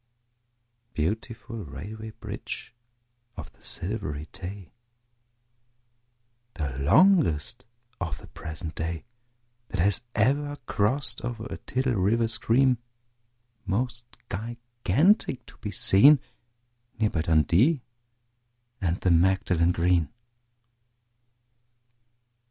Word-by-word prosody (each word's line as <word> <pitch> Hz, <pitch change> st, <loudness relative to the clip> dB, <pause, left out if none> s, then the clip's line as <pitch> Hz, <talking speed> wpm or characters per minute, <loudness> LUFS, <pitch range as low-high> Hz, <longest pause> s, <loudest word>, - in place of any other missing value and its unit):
Beautiful 110 Hz, +8 st, -3 dB
Railway 110 Hz, +8 st, -8 dB
Bridge -, -, -6 dB, 0.6 s
of 80 Hz, -1 st, -8 dB
the -, -, -29 dB
Silvery 85 Hz, -7 st, -3 dB
Tay! 95 Hz, 0 st, -8 dB, 1.8 s
The 75 Hz, -6 st, -3 dB
longest 115 Hz, -, +4 dB, 0.3 s
of 80 Hz, -7 st, -3 dB
the -, -, -13 dB
present 80 Hz, 0 st, -7 dB
day 80 Hz, +3 st, -4 dB, 0.6 s
That 100 Hz, -, -4 dB
has 100 Hz, +5 st, +3 dB
ever 145 Hz, +7 st, +2 dB
crossed 115 Hz, +6 st, 0 dB
o'er 115 Hz, -2 st, -4 dB
a -, -, -4 dB
tidal 130 Hz, 0 st, -1 dB
river 110 Hz, +3 st, +2 dB
stream, 120 Hz, +2 st, +2 dB, 0.9 s
Most 120 Hz, +3 st, -1 dB, 0.2 s
gigantic 120 Hz, -, +1 dB
to -, -, -15 dB
be 105 Hz, -, -5 dB
seen, 115 Hz, +9 st, +6 dB, 0.8 s
Near 110 Hz, -2 st, +2 dB
by 80 Hz, -, 0 dB
Dundee 85 Hz, -, +3 dB, 1.0 s
and 90 Hz, -1 st, 0 dB
the 90 Hz, -, +3 dB
Magdalen 90 Hz, 0 st, +3 dB
Green. 85 Hz, -2 st, +2 dB
105 Hz, 90 wpm, -27 LUFS, 85-120 Hz, 1.8 s, seen